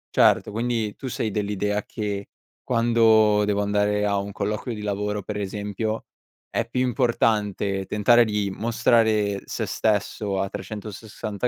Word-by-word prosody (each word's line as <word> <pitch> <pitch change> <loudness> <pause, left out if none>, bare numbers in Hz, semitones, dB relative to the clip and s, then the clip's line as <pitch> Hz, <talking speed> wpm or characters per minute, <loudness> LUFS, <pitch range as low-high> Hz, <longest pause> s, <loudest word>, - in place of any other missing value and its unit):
Certo, - - +4
quindi 115 -1 -1
tu 135 - -7
sei 110 -3 -2
dell'idea 105 0 -1
che, 100 -2 -4 0.4
quando 115 -3 +4
devo 105 0 +1
andare 105 0 +1
a 100 -1 +1
un 100 +1 -5
colloquio 105 +5 -3
di 105 - -7
lavoro, 105 0 -2
per 105 +1 -5
esempio, 105 +2 -3 0.5
è 115 0 -1
più 125 +1 -1
importante 105 -6 +1
tentare 120 +3 +5
di 105 -2 -1
mostrare 110 -3 +2
se - - -3
stesso 105 -2 -1
a 95 0 -1
360 105 +2 -5
105 Hz, 135 wpm, -24 LUFS, 100-115 Hz, 0.5 s, tentare